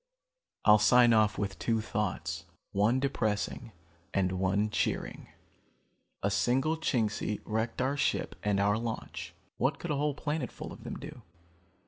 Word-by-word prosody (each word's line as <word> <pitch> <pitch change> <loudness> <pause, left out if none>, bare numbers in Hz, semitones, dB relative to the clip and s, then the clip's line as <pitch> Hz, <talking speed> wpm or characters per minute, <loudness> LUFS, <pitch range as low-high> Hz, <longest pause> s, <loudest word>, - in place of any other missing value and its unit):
"I'll 105 0 +8
sign 120 +2 +6
off 105 -2 +3
with 100 -2 -3
two 115 -1 +1
thoughts, 85 -6 -3 0.2
one 105 +6 +3
depressing 115 -3 -1 0.4
and 95 -2 +2
one 95 +3 +1
cheering. - - -2 1.0
A 100 - +2
single 135 +9 +2
Chingsi 110 -8 0
wrecked 110 +3 -1
our 140 +2 0
ship - - 0
and 105 -1 +1
our 105 +2 +3
launch. 85 -7 -5 0.2
What 135 +5 +1
could 175 - -4
a - - +1
whole 145 0 0
planetful 150 -3 -4
of - - -11
them - - -5
do? - - -9
110 Hz, 140 wpm, -30 LUFS, 100-125 Hz, 1.0 s, I'll